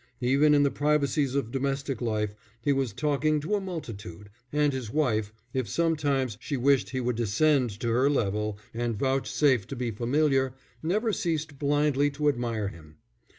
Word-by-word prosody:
Even 140 +4 +4
in 145 - +5
the 140 - +2
privacies 145 -2 +1
of 135 -5 -1
domestic 135 -1 -2
life 105 -3 -1 0.3
he 140 +5 +1
was 135 -4 0
talking 150 +5 +1
to 155 +8 -3
a 205 - +2
multitude; 105 - -7 0.2
and 150 -1 +2
his 130 -4 -4
wife, 110 -7 0 0.2
if 130 -6 -1
sometimes 145 -8 0
she 140 - -3
wished 135 +1 +3
he 130 - -2
would 125 -1 -1
descend 125 +4 +2
to 120 -1 -1
her 125 +4 +3
level 105 -5 0 0.2
and 115 -1 -2
vouchsafe 130 -2 +1
to - - -5
be 120 -1 -2
familiar, 135 +3 +1 0.3
never 210 +7 0
ceased 155 -6 -2
blindly 145 0 +2
to 145 +1 +1
admire 115 -6 -1
him. 80 -4 -14
135 Hz, 165 wpm, -27 LUFS, 115-150 Hz, 0.3 s, in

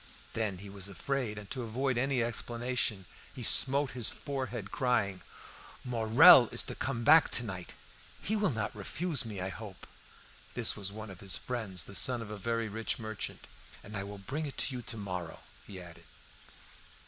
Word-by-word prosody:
Then 110 -4 -1
he 100 +3 -9
was 100 0 -5
afraid, 115 +2 -3
and 105 -1 -8
to 130 - -3
avoid 125 +3 -1
any 130 0 +1
explanation 120 -3 -1 0.3
he 125 - -6
smote 140 +4 +5
his 125 -4 -1
forehead, 125 -7 -5
crying 110 -8 0 0.6
"Morel 115 -2 +8
is - - +2
to - - -5
come 115 - -3
back 155 +5 +7
to 120 - -2
night; 95 -5 -7 0.4
he 215 - -2
will 210 -2 +2
not 110 -7 -3
refuse 145 - 0
me, 105 -4 -5
I 95 +1 -2
hope" 100 -1 -9 0.7
(this - - +2
was 100 -1 -4
one 110 0 -8
of 90 - -11
his 95 -1 -3
friends, 110 -8 -3
the - - -10
son 120 +5 +3
of 105 - -9
a - - -4
very 115 +2 -1
rich 110 +2 -2
merchant); 110 -2 -5 0.4
"and 105 - -9
I 100 - -2
will 100 +1 -8
bring 140 +10 -4
it 140 - -2
you 125 -1 -4
to 115 0 -4
morrow," 90 -5 -5 0.3
he 95 -2 -8
added. 85 -2 -12
110 Hz, 180 wpm, -31 LUFS, 100-125 Hz, 0.7 s, Morel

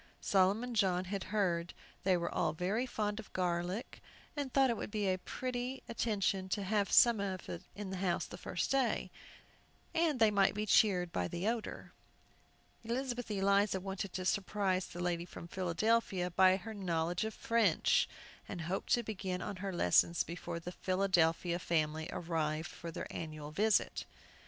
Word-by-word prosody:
Solomon 200 +6 +2
John 185 -4 +2
had 195 +1 -3
heard 175 -5 0 0.3
they 185 -2 +4
were 170 0 -3
all - - +1
very 195 +9 -1
fond 210 -3 -2
of 220 - -10
garlic, 180 +4 -2 0.3
and 285 -3 -3
thought 270 -2 +4
it - - 0
would - - -5
be 210 -1 -1
a 185 0 +1
pretty 255 +4 -4
attention 195 -5 0
to 200 +2 -1
have 200 +1 0
some 235 -3 +7
in 190 0 -5
the 190 - -3
house 180 -2 0
the - - -9
first - - -3
day, 270 -3 +1 0.8
that 325 -4 +2
they 220 -3 +5
might 200 -1 +3
be 210 +1 -1
cheered 185 -4 +4
by 90 - -1
the 175 - -3
odor. 230 -1 -3 0.9
Elizabeth 245 +1 -2
Eliza 200 -1 +2
wanted 195 0 -4
to 185 -1 -3
surprise 190 -1 0
the 175 - -9
lady 175 -1 -1
from 170 -1 -9
Philadelphia 185 +1 0
by 185 +1 +5
her 220 +3 -7
knowledge 175 -3 -1
of 220 0 -4
French, 225 -8 +2 0.4
and 175 - -4
hoped 175 +4 -3
to 240 - +3
begin 190 -4 -3
on 195 +1 -5
her 195 +1 -3
lessons 170 - +3
before 170 0 -5
the 175 +1 -6
Philadelphia 180 -2 +1
family 160 -2 0
arrived 160 -2 -2
for 170 - -8
their 165 - -5
annual 155 -2 -6
visit. 215 +6 +1
190 Hz, 160 wpm, -34 LUFS, 175-215 Hz, 0.9 s, some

